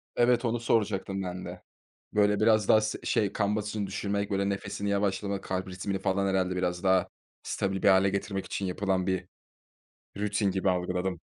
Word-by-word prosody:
Evet, 120 0 +3
onu 115 0 0
soracaktım 100 -4 0
ben 90 0 -5
de. - - -8 0.5
Böyle 105 -1 +3
biraz 110 -2 +4
daha 110 - +7
s 110 0 -2
şey, 100 -3 +1
kan 105 0 0
basıncını 105 -1 -2
düşürmek, 100 +1 -2
böyle, 100 0 +1
nefesini 100 +1 -3
yavaşlamak, 100 0 -1
kalp 95 0 -3
ritmini 95 +1 -3
falan 95 +1 0
herhâlde 95 -1 +1
biraz 90 -1 -1
daha 95 -1 +3 0.3
stabil 95 -1 -2
bir - - +5
hâle 95 0 +5
getirmek 100 0 -3
için 100 - -3
yapılan 95 0 0
bir 95 -1 -1 0.9
rutin 105 -1 +1
gibi 95 0 +1
algıladım. 90 0 -1
100 Hz, 170 wpm, -28 LUFS, 95-105 Hz, 0.9 s, daha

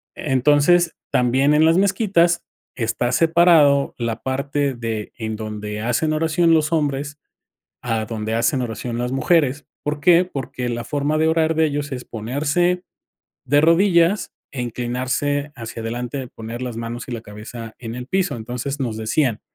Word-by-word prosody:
Entonces, 150 +5 +3 0.2
también 130 +4 +3
en 155 +1 +5
las 165 +2 +4
mezquitas 190 -3 +2 0.3
está 120 +1 -1
separado 160 -2 +4
la 115 -2 -3
parte 140 +1 -1
de, 115 -3 -4
en 110 -2 -3
donde 105 -1 -5
hacen 120 +7 0
oración 165 +2 +2
los 155 -1 +2
hombres, 145 -2 -1 0.7
a 115 -3 -1
donde 110 -1 -3
hacen 115 +4 +1
oración 120 +1 -4
las 125 +1 -2
mujeres, 145 0 +1 0.2
¿por 150 0 -2
qué?, 175 +4 +5
porque 130 -6 -5
la 120 0 -3
forma 145 +1 -1
de 160 +1 +3
orar 160 0 +2
de 160 0 +4
ellos 145 -1 -3
es 125 -1 -5
ponerse 145 +10 0 0.6
de 145 +2 +4
rodillas 170 +3 +3 0.2
e 130 -3 -3
inclinarse 130 +5 -2
hacia 115 0 -7
adelante, 120 +3 -4
poner 115 +2 -7
las 125 -3 -4
manos 115 +1 -5
y 125 - -5
la 115 - -5
cabeza 110 +2 -9
en 115 -2 -6
el 125 0 -6
piso, 185 -2 0
entonces, 125 +5 -5
nos 120 -5 -2
decían: 110 +1 0
135 Hz, 155 wpm, -21 LUFS, 115-155 Hz, 0.7 s, en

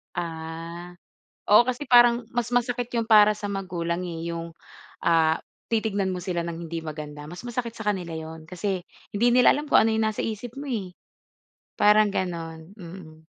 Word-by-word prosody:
Ah, 170 +1 -6 0.6
oo, 210 - +10
kasi 265 +4 -3
parang 240 -1 +6
mas 240 -1 -1
masakit 245 0 0
'yon 230 - 0
para 210 -1 +6
sa 205 - -6
magulang 180 -3 -3
eh. 170 -2 -5
'Yong, 165 0 -5 0.6
ah, 160 -1 +4 0.3
titignan 215 -4 0
mo 185 - -2
sila 175 -1 -2
ng 170 0 -5
hindi 165 0 -4
maganda. 150 -1 -7
Mas 175 +8 -9
masakit 235 -1 -4
sa 220 - -7
kanila 170 -4 -5
'yon, 160 0 -9
kasi 185 0 -2 0.3
hindi 230 +4 +3
nila 250 +1 +6
alam 295 0 -4
kung - - +6
ano 225 - +2
'yong 220 - +1
nasa 215 - -3
isip 225 +4 -6
mo 285 - -6
eh, 205 -9 -4 0.8
parang 210 -1 +4
gano'n. 165 0 -4
Mm. 165 -4 -11
185 Hz, 170 wpm, -25 LUFS, 165-225 Hz, 0.8 s, oo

